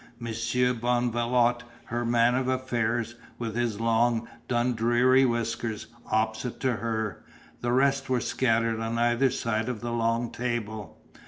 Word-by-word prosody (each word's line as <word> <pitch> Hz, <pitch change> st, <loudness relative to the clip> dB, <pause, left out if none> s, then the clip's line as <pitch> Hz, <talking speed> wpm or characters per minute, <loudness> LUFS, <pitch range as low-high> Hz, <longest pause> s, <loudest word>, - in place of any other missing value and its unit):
Monsieur 120 Hz, +2 st, 0 dB
Bonvalot, 120 Hz, 0 st, +1 dB, 0.2 s
her 120 Hz, +1 st, -3 dB
man 120 Hz, 0 st, +3 dB
of 130 Hz, 0 st, 0 dB
affairs, 120 Hz, -3 st, -1 dB, 0.2 s
with 115 Hz, -2 st, -4 dB
his 120 Hz, -3 st, -1 dB
long 115 Hz, 0 st, +2 dB, 0.2 s
Dundreary 120 Hz, +2 st, +3 dB
whiskers, 115 Hz, -2 st, -2 dB, 0.2 s
opposite 110 Hz, +2 st, -1 dB
to 130 Hz, -4 st, +1 dB
her; 110 Hz, -4 st, -3 dB, 0.4 s
the 120 Hz, -, 0 dB
rest 135 Hz, +1 st, +2 dB
were 130 Hz, -1 st, +2 dB
scattered 115 Hz, -2 st, +1 dB
on 115 Hz, +1 st, -2 dB
either 120 Hz, +3 st, +3 dB
side 115 Hz, -2 st, -1 dB
of 115 Hz, -4 st, -4 dB
the 120 Hz, -, -3 dB
long 115 Hz, 0 st, 0 dB
table. 110 Hz, -4 st, -4 dB
120 Hz, 135 wpm, -27 LUFS, 115-125 Hz, 0.4 s, man